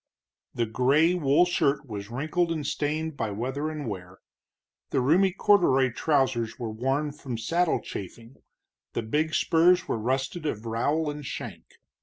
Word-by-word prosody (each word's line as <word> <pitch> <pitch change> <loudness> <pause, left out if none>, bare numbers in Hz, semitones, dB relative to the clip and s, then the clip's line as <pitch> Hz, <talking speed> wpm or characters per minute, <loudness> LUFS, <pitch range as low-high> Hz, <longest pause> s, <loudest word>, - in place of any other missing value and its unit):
The 120 - +1
gray 135 +9 +3
wool 160 0 +3
shirt 150 -4 +1
was 100 -3 -6
wrinkled 155 +7 -1
and 155 -3 -3
stained 155 +2 -2
by 115 -5 -2
weather 130 +9 -3
and 150 -4 -5
wear, 95 -3 -7 0.7
the - - +1
roomy 170 +9 +4
corduroy 170 -10 +3
trousers 130 -4 0
were 115 -3 -4
worn 135 +6 -1
from 135 -5 -6
saddle 170 +9 +1
chafing, 115 +6 -9 0.6
the 115 - -2
big 155 +8 0
spurs 175 +2 +4
were - - -1
rusted 135 +7 -2
of 110 -5 -4
rowel 145 +7 0
and 145 0 -8
shank. - - -7
140 Hz, 150 wpm, -27 LUFS, 115-160 Hz, 0.7 s, roomy